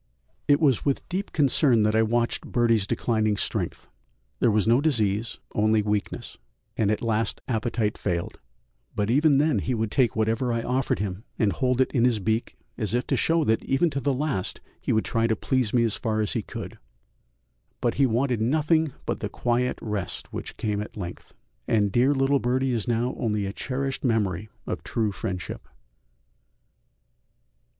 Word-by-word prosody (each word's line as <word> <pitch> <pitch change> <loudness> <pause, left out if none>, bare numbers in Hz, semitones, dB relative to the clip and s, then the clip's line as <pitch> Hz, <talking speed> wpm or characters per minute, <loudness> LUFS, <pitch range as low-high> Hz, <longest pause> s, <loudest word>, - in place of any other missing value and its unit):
It 145 -1 +5
was 140 -7 +3
with 140 -2 -1
deep 190 +3 -3
concern 135 -5 +3
that 105 0 +2
I 110 - +4
watched 120 +1 0
Birdie's 115 -4 +2
declining 110 -2 +1
strength; - - -3 0.5
there - - +4
was 105 -1 +2
no 120 +4 +5
disease, 115 -6 0 0.2
only 110 0 +3
weakness, 105 -1 -3 0.4
and 105 -3 +1
at 110 - 0
last 110 -1 0
appetite 110 -2 -1
failed, 85 -3 -2 0.6
but 105 +2 0
even 145 +2 +4
then 145 -5 +3
he 125 +6 -1
would 110 -2 -1
take 130 -5 +2
whatever 115 +3 +1
I 115 0 -1
offered 130 +1 0
him 100 0 -4
and 105 -4 +2
hold 125 +6 +1
it 130 - +2
in 120 -4 +2
his 120 -3 +3
beak 110 +3 -1 0.2
as 110 0 0
if 125 - 0
to - - 0
show 165 0 +2
that 110 -5 +1
even 150 +5 +2
to 140 - -2
the 140 +1 0
last 135 -8 -2 0.2
he - - -2
would 110 - +2
try 115 0 +1
to 110 - +1
please 130 -2 0
me 120 -2 +3
as 115 -2 +1
far 110 -1 -1
as 105 -2 0
he - - 0
could, - - -8 1.0
but - - +1
he 135 - +6
wanted 120 0 0
nothing 155 +4 +2
but - - -2
the - - -3
quiet 125 +1 0
rest 105 -4 -4
which - - -6
came 105 -2 -1
at 105 - -8
length, 90 -4 -7 0.3
and 105 -3 +2
dear 130 +6 +3
little 135 +1 +3
Birdie 130 +2 +1
is 115 -3 -2
now 120 +1 0
only 105 -3 0
a 100 - -4
cherished 135 +3 -3
memory 105 -5 0 0.2
of - - -4
true 110 -3 -1
friendship. 95 -2 -5
115 Hz, 180 wpm, -26 LUFS, 105-130 Hz, 1.0 s, he